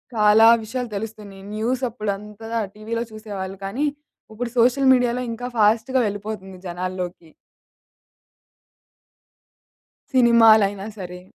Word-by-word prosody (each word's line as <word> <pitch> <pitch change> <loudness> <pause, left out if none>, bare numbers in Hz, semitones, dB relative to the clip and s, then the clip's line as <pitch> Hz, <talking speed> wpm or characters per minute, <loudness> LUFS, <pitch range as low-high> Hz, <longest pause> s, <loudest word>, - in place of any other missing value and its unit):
కాలా 215 +1 +6 0.2
విషయాలు 245 +2 -4
తెలుస్తున్నియి. 205 -2 -8
న్యూసప్పుడంతా 220 -3 -3 0.3
టీవీలో 230 +2 -3
చూసేవాళ్ళు, 200 -3 -7
కానీ, 245 +10 -2 0.5
ఉప్పుడు 240 +2 -4
సోషల్ 260 +3 +4
మీడియాలో 245 0 +1
ఇంకా 245 +2 -5
ఫాస్ట్‌గా 225 +5 +3
వెళ్ళిపోతుంది 200 -2 -6
జనాల్లోకి. 180 -1 -5 2.8
సినిమాలయినా 220 -5 +5
సరే. 180 -1 -7
215 Hz, 85 wpm, -22 LUFS, 195-235 Hz, 2.8 s, కాలా